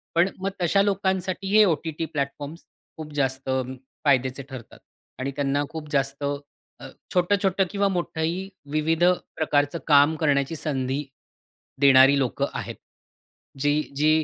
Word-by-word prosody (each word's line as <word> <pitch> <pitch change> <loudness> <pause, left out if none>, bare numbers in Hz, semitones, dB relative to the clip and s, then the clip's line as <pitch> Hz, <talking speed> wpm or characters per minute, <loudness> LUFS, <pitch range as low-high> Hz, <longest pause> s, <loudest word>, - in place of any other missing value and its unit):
पण 175 +3 +4
मग 195 +1 -1
तशा 195 +4 +3
लोकांसाठी 190 -1 -1
हे 215 - +8
ओ-टी-टी 160 -1 -1
प्लॅटफॉर्म्स 145 +1 -5 0.3
खूप 155 -1 -8
जास्त 135 -1 -1 0.6
फायद्याचे 130 -1 +2
ठरतात 130 -4 -10 0.4
आणि 135 +1 -2
त्यांना 140 +1 0
खूप 155 -2 -7
जास्त 135 0 0 0.6
अ, - - -9 0.3
छोटं-छोटं 190 +1 +2
किंवा 200 0 +1
मोठंही 175 +1 -2 0.2
विविध 160 +2 +1 0.3
प्रकारचं 145 0 +1
काम 145 +1 +5
करण्याची 145 0 +1
संधी 135 -1 -2 0.8
देणारी 135 0 +7
लोक 130 -3 -2
आहेत. - - -5 0.8
जी 145 +2 +2
जी 155 +2 +3
150 Hz, 120 wpm, -25 LUFS, 140-175 Hz, 0.8 s, हे